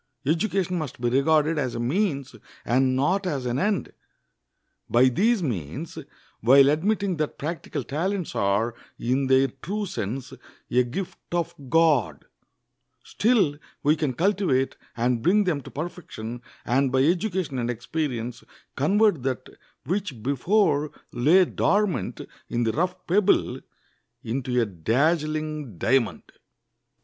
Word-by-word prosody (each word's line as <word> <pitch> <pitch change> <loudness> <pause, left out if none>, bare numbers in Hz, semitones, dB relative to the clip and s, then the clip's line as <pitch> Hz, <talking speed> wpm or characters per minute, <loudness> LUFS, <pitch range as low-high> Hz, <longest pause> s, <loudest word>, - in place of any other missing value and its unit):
Education 180 +3 0
must 150 -7 -6
be 120 0 +1
regarded 155 +4 +3
as 130 -4 -2
a - - -3
means 140 - -1 0.3
and 130 +1 +2
not 180 +9 +1
as 140 -7 -2
an 125 +1 -1
end. 205 +3 0 1.0
By 125 +2 +5
these 210 - +2
means, 90 - -4 0.4
while 135 +4 +6
admitting 195 +3 0
that 155 -1 -2
practical 155 -2 -4
talents 175 - -2
are, 100 +4 +1 0.2
in 130 +3 0
their 135 +1 +4
true 205 +4 -3
sense, 130 - -4 0.4
a 125 +1 +4
gift 170 +10 -5
of 170 -1 -1 0.2
God, 155 -6 +2 0.8
still 205 -11 +2 0.2
we 150 +1 +4
can 150 -4 -1
cultivate 170 - +1 0.2
and 120 0 +1
bring 195 - +4
them 170 -7 0
to - - -11
perfection, 135 -8 -6 0.2
and 135 +2 +2
by 130 0 +3
education 175 -3 0
and 120 0 -1
experience 120 -1 -3 0.3
convert 195 - +3
that 130 -2 -3 0.4
which 165 - -3
before 150 - +2 0.2
lay 155 +10 +5
dormant 185 - 0 0.3
in 120 0 0
the 115 - +1
rough 180 +6 -2
pebble 200 +3 +2 0.6
into 125 +1 -1
a 115 - +3
dazzling 150 - -1
diamond. 130 +5 +1
145 Hz, 125 wpm, -25 LUFS, 125-180 Hz, 1.0 s, while